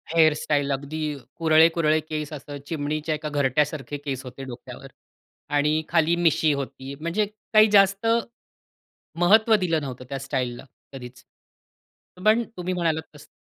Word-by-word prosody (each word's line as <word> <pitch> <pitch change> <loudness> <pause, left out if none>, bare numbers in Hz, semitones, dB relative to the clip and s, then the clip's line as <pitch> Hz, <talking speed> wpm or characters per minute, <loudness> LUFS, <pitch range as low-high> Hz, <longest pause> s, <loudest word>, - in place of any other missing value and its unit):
Hair 160 -2 +6
style 145 -2 -1
अगदी 150 +2 -3
अ, - - -10 0.2
कुरळे, 160 0 +5
कुरळे 155 -2 +2
केस 155 -1 -5
असं 145 0 -8
चिमणीच्या 155 0 -2
एका 150 0 -5
घरट्यासारखे 145 0 0
केस 135 -2 -3
होते 130 +1 -9
डोक्यावर 125 -2 -9 0.7
आणि 150 +2 +2
खाली 165 0 +3
मिशी 160 -3 +2
होती. 135 0 -6
म्हणजे 170 +6 0 0.3
काही 215 0 +7
जास्त, 195 +1 +4 1.1
महत्त्व 220 +5 +5
दिलं 170 -6 0
नव्हतं 130 -2 -7
त्या 135 -1 -4
स्टाईलला 125 -2 -3 0.3
कधीच. 125 -1 -10 1.0
पण 220 +2 +4
तुम्ही 180 +1 -3
म्हणालात 165 -3 0
तसं 150 +1 -14
155 Hz, 140 wpm, -24 LUFS, 140-165 Hz, 1.1 s, काही